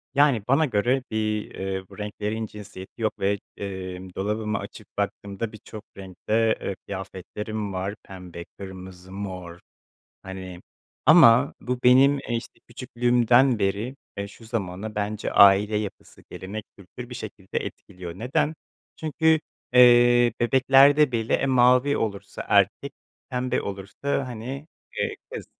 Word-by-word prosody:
Yani, 140 -7 +4
bana 140 +5 +4
göre 125 +2 +1
bir, 110 -1 -1
eee, 95 0 -3
bu - - -14
renklerin 105 +1 -3
cinsiyeti 105 0 -11
yok 110 - -1
ve, 100 +1 +1 0.2
eee, 95 -2 -5 0.2
dolabımı 105 +2 -2
açıp - - -10
baktığımda 100 +2 -3
birçok 110 0 -11
renkte, 110 +4 0
eee, 100 - -3
kıyafetlerim 100 +2 -6
var. 95 +2 -3
Pembe, 90 -2 -10
kırmızı, 95 -1 -10
mor, 90 -3 -7 0.6
hani, 95 -2 -8 0.4
ama 140 -5 +7
bu 125 0 -3
benim, 135 +3 +6
eee, 120 - -3
işte, 115 - -8
küçüklüğümden 120 0 +2
beri, 105 +7 -1 0.2
eee, 100 0 -4
şu 115 - -15
zamana 105 -2 -4
bence 105 +1 -3
aile 100 +2 +6
yapısı, 105 -2 -6
gelenek, 100 +3 -7
kültür, 120 +6 -11
bir - - -6
şekilde 105 -4 -5
etkiliyor. 90 -3 -8
Neden? 135 +6 0 0.4
Çünkü, 160 0 +2 0.3
eee, 120 -1 +6
bebeklerde 135 +3 +5
bile, 115 -1 0
e, 140 - +1
mavi 125 +2 +4
olursa 100 -3 -4
erkek, 100 +8 +2 0.4
pembe 125 0 -1
olursa, 100 +8 -3
hani, 125 +5 -6 0.3
eee, - - -1 0.2
kız. - - -7
110 Hz, 130 wpm, -25 LUFS, 95-125 Hz, 0.6 s, ama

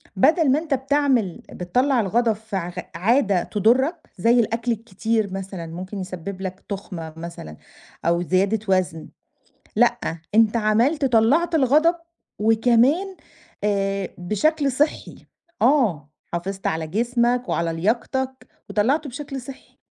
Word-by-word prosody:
بدَل 295 - +4
ما 285 - +3
أنت 315 -3 -3
بتعمل 265 - +1
بتطلّع 250 +9 +1
الغضب 225 +3 +2
في 220 0 -8
ع 175 -2 -2
غ 180 +1 -6
عادة 200 -1 +2
تضُرّك 260 - +1
زي 230 +6 +4
الأكل 230 +1 0
الكتير 220 -1 -1
مثلًا، 190 -3 -5
ممكن 185 +5 -7
يسبّب 185 +1 -6
لك 185 -1 -6
تخمة 180 -5 -6
مثلًا، 165 - -8 0.5
أو 170 +1 +2
زيادة 195 +4 +1
وزْن، 185 -4 0 0.7
لأ، - - +4 0.4
أنت 225 0 +4
عملت 230 +8 +2
طلّعت 265 +8 +3
الغضب 310 +4 +4 0.4
وكمان 245 - +3 0.5
آآ 195 -2 0
بشكل 275 - +1
صحّي، 295 +4 -2 0.4
آه، 215 - +2 0.2
حافظت 190 +3 -4
على 160 0 -1
جسمك 240 +5 0
وعلى 170 -1 0
لياقتك 255 +8 -2 0.2
وطلّعته 275 +8 +1
بشكل 275 0 -6
صحّي. 260 +2 -12
225 Hz, 125 wpm, -23 LUFS, 185-265 Hz, 0.7 s, بدَل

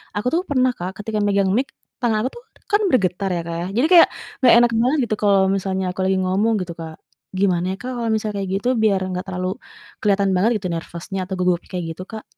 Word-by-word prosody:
aku 205 +4 -2
tuh 340 - +3
pernah, 255 -3 +3
Kak, 180 +1 -5
ketika 215 0 -3
megang 200 -1 +2
mic 260 +4 +1 0.4
tangan 225 -3 +2
aku - - -3
tuh 480 - -12 0.3
kan 415 +1 +3
bergetar 195 -4 +1
ya, 170 - -1
Kak, 170 - -4
ya, - - -3
jadi 285 - +3
kayak 340 - +9 0.4
nggak 255 - +7
enak 240 0 +4
banget 255 +6 +2
gitu 215 - 0
kalau 200 -2 +4
misalnya 190 0 -2
aku 190 - -2
lagi 190 0 +2
ngomong 195 +5 +1
gitu, 175 -2 -6
Kak, 165 -1 -7 0.5
gimana 180 -3 +2
ya, - - -4
Kak, 255 - -5
kalau 235 -1 -2
misal 215 0 -2
kayak 195 -1 -3
gitu, 245 - -4 0.2
biar 200 -3 +3
enggak 185 0 -4
terlalu 185 -1 -3 0.5
kelihatan 200 -1 +2
banget 195 +5 +3
gitu 190 - -4
nervous-nya 170 +3 -5
atau 190 - -5
gugupnya 180 -1 0
kayak 180 -2 -3
gitu, 180 - -8
Kak? 220 -1 -7
195 Hz, 230 wpm, -21 LUFS, 185-225 Hz, 0.5 s, kayak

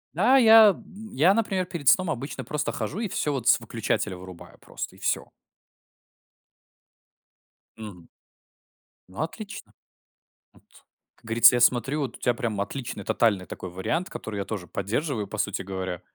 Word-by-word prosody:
Да, 265 - +4
я, 225 -3 +8
м, 210 +3 -7
я, 165 +8 +4
например, 195 -4 0
перед 170 -6 0
сном 185 -2 +4
обычно 135 +4 -5
просто 150 0 -2
хожу 180 - -4
и 220 - -2
всё 150 -4 -1
вот 130 -2 0
с - - +5
выключателя 110 -3 -2
вырубаю 90 -1 -12
просто- - - -7
и - - -18
всё. - - -1 2.5
Мгм. 100 -6 -10 1.0
Ну 95 - -6
отлично. 200 +6 -7 0.8
Вот. - - -23 0.5
Как - - -27
говорится, 115 +2 +6
я 120 - +1
смотрю, 130 +5 +2
вот 130 -4 -4
у - - -35
тебя 125 - +1
прям 115 -4 -3
отличный 125 +4 -5
тотальный 100 -6 +1
такой 90 - -8
вариант, 95 - -3
который 105 -2 -7
я 100 - -3
тоже 100 -5 -6
поддерживаю, 110 - -3
по - - -7
сути - - -1
говоря. 95 -2 -5
120 Hz, 155 wpm, -25 LUFS, 100-165 Hz, 2.5 s, я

